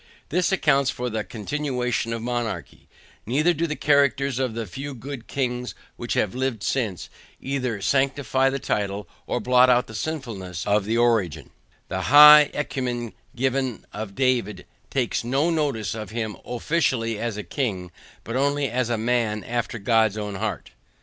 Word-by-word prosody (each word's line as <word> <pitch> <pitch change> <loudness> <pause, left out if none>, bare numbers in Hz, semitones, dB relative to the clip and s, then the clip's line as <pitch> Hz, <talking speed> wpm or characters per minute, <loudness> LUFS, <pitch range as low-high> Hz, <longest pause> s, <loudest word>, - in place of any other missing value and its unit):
This 180 +4 +1
accounts 140 -8 +3
for 125 -1 -3
the 110 -1 -2
continuation 125 0 -2
of 115 -1 -3
monarchy; 120 -2 -4 0.4
neither 150 +9 +3
do 170 +1 -1
the 155 - -3
characters 140 -2 +2
of 125 -4 -1
the 115 -1 -3
few 135 +8 -7
good 130 0 -8
kings 125 -2 -2 0.2
which 120 - -3
have 105 - +1
lived 130 -5 -2
since, 100 - -1 0.3
either 125 -7 -3
sanctify 135 -1 +2
the 135 - -2
title, 100 -5 -2 0.2
or - - -1
blot 125 0 +5
out 125 0 +4
the 110 - -12
sinfulness 105 - -5
of 105 -1 +2
the 115 +2 0
origin; 110 -10 +1 0.4
the - - -3
high 150 +1 +9
encomium 125 -5 -3 0.2
given 130 -1 -1
of 105 -2 -6
David 125 -7 0 0.2
takes 125 -4 -1
no 135 +8 +1
notice 140 - -1
of 110 -3 -6
him 110 -1 -3
OFFICIALLY 120 -4 0
AS 115 -3 -3
A 105 - -4
KING, 95 - -3 0.3
but 115 - -5
only 140 -1 +1
as 125 0 0
a 120 - 0
MAN 110 -2 0
after 120 0 -3
God's 110 0 +2
own 105 -1 -4
heart. 95 - -4
125 Hz, 160 wpm, -24 LUFS, 110-135 Hz, 0.4 s, high